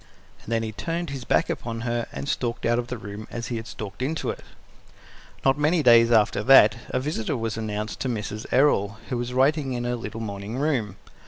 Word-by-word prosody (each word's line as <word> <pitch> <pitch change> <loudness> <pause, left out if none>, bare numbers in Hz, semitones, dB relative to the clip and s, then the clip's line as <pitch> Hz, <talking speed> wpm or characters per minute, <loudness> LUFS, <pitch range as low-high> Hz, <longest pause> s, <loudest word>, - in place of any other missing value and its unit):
And - - -9
then 115 -1 +1
he 110 - -3
turned 165 +7 -3
his 135 -3 -6
back - - +2
upon 115 -1 -4
her 120 -1 -2
and 70 0 -6
stalked 120 -1 -2
out 120 +1 +2
of 120 - -3
the 125 - -4
room 100 +1 -8
as 120 0 -5
he 120 - -2
had 110 +1 -7
stalked 105 0 -7
into 155 +5 -1
it. - - -9 1.0
Not 135 +2 +3
many 155 +2 +2
days 115 -1 +7
after 105 -3 +3
that, 115 -3 +7
a 130 - 0
visitor 135 -2 -2
was 115 -1 -2
announced 105 -1 -4
to 130 - -2
Mrs. 110 -1 -4
Errol, 110 -7 +3
who 125 - -1
was 120 +1 -3
writing 135 +1 +2
in 120 -1 -2
her 120 0 -1
little 115 -1 -6
morning 105 +1 -5
room. 130 -9 0
120 Hz, 215 wpm, -25 LUFS, 110-130 Hz, 1.0 s, days